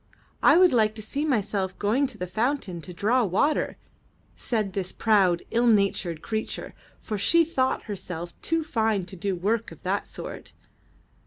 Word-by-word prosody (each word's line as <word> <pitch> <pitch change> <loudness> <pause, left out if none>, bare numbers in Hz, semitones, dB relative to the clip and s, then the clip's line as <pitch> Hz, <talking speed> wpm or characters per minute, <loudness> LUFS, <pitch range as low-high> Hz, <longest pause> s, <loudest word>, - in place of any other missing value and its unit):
'' - - -36
''I - - +7
would 365 -3 +6
like 215 -2 +3
to 220 - -6
see 280 +7 -2
myself 205 -8 -1
going 240 +8 +1
to - - -8
the 180 - -3
fountain 205 - -2
to 180 - -9
draw 225 +8 +2
water," 225 - +1 0.6
said 215 -5 -2
this 185 -2 -2
proud, 195 -6 +3
ill 240 +1 +2
natured 195 -6 +1
creature, 220 -1 -4 0.3
for 210 -2 -4
she 335 - +4
thought 260 -5 0
herself 180 -5 -5
too 330 -1 0
fine 220 - 0
to 190 - -10
do 190 +2 -2
work 215 +6 -1
of - - -14
that - - -1
sort. - - -8
215 Hz, 170 wpm, -26 LUFS, 190-245 Hz, 0.6 s, I